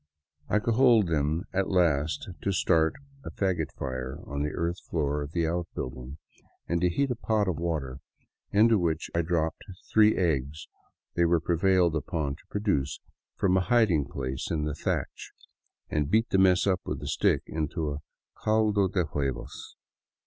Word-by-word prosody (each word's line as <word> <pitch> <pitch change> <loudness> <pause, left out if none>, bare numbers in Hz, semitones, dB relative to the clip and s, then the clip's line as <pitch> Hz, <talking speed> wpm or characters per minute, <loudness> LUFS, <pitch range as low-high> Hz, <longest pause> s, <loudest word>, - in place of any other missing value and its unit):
I - - +3
cajoled 115 -3 +4
them 80 +2 0
at 95 0 0
last 80 -2 +1
to 100 - 0
start 80 -3 +2 0.3
a - - -6
fagot 90 -6 -1
fire 65 -1 -4
on 70 0 -4
the 75 - 0
earth 85 +3 -2
floor 75 -2 0
of 70 0 -6
the 85 -1 0
outbuilding, 70 -5 -4 0.5
and 85 0 0
to 90 - +3
heat 135 +9 0
a - - 0
pot 110 -3 0
of 90 -5 -1
water 75 -6 -3 0.5
into 110 +1 +5
which 80 -2 -1
I 85 - +2
dropped 80 -1 -1 0.3
three 110 0 +5
eggs 75 -4 -1 0.5
they 85 - +2
were 85 0 +3
prevailed 90 0 +2
upon 75 -1 -2
to - - -19
produce 100 -10 -1 0.4
from 95 -1 +2
a 95 - +2
hid 115 -2 +3
ing 75 -4 +2
place 65 -1 -4
in 80 -2 -1
the 75 0 -2
thatch, 75 - -3 0.5
and 75 -2 -1
beat 110 +2 +2
the 95 - +3
mess 95 -1 +4
up 95 -3 +1
with - - -4
a - - -5
stick - - +1
into 80 0 -2
a 70 - -4 0.3
" - - -28
caldo 110 -2 +3
de 90 -1 0
huevos." 70 -4 -4
85 Hz, 170 wpm, -28 LUFS, 75-95 Hz, 0.5 s, into